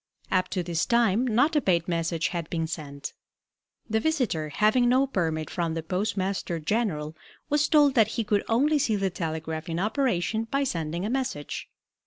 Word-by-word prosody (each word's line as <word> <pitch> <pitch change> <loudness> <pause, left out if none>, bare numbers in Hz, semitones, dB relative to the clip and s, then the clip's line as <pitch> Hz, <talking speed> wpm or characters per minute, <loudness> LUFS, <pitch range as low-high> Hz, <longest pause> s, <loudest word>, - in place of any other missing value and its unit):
Up 185 -1 +2
to 180 - -2
this 170 -1 -1
time 235 0 +3
not 255 +8 +3
a 295 - +4
paid 170 -6 +1
message 165 -1 0
had 170 -3 -4
been 165 -1 -1
sent. 150 -4 -6 0.7
The 220 0 +1
visitor, 225 - 0
having 215 - +3
no 260 +2 +4
permit 160 - -1
from 170 -2 -1
the 165 - -3
Postmaster 190 0 -2
General, 155 -4 -1 0.4
was 295 0 +3
told 295 -3 +5
that 225 -5 +5
he 230 - +1
could 205 -1 +1
only 290 +7 +3
see 225 -5 +1
the 195 -2 0
telegraph 160 -1 -4
in 165 - -2
operation 220 - 0
by 275 +5 0
sending 170 - -2
a - - -1
message. 255 - -3
190 Hz, 175 wpm, -26 LUFS, 165-240 Hz, 0.7 s, told